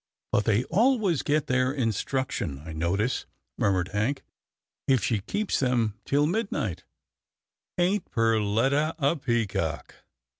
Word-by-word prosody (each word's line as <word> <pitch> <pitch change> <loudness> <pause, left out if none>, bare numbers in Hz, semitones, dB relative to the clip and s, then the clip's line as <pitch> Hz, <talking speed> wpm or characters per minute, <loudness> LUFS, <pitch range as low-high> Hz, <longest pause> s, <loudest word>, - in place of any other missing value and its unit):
" - - -58
But 105 - +2
they 110 +1 +3
always 210 - +2
get 150 0 +1
their 130 -1 +1
instruction, 115 - -2
I 80 - -7
notice," 95 +9 -1 0.3
murmured 95 -2 +1
Hank, 115 +7 -1 0.6
"if 130 -4 +3
she 110 -4 +1
keeps 205 - -1
them 120 -5 +1
till 145 +1 +2
midnight 175 - -2 0.5
— - - -64
ain't 180 +2 +1
Perletta 115 +8 +2
a 145 +1 +2
peacock 110 - -2
125 Hz, 125 wpm, -27 LUFS, 105-150 Hz, 0.6 s, they